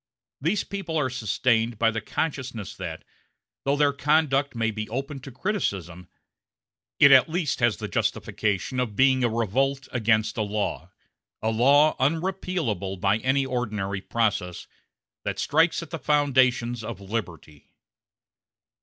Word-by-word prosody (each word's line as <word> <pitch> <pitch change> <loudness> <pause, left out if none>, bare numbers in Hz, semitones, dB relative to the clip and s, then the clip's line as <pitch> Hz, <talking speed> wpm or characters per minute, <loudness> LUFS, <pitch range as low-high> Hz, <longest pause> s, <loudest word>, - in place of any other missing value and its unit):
These 175 +8 +1
people 180 -5 -4
are 135 -4 0
sustained 115 -1 0
by 115 +1 +3
the 115 0 -3
consciousness 125 -4 -4
that, - - -6 0.6
though 140 +1 +2
their 145 -1 +3
conduct 145 -2 +1
may 115 -1 0
be 110 0 -5
open 135 +4 -4
to 135 +1 -10
criticism, 95 - -3 0.9
it 140 - +8
at 130 +3 +7
least 165 -3 -1
has 120 -3 +2
the - - -5
justification 105 +4 -1
of 115 -5 -2
being 130 +1 +4
a 120 - +3
revolt 130 +5 0
against 110 -2 +1
a - - 0
law 105 0 -2 0.5
a 110 - +1
law 140 +7 +4
unrepealable 155 - -1
by 100 +3 +2
any 135 +3 +1
ordinary 105 -7 -3
process 100 -6 -1 0.6
that - - -3
strikes 165 +3 +2
at - - -12
the 165 - -4
foundations 130 -5 +2
of 105 -3 -6
liberty. 95 -8 -7
125 Hz, 135 wpm, -25 LUFS, 110-145 Hz, 0.9 s, it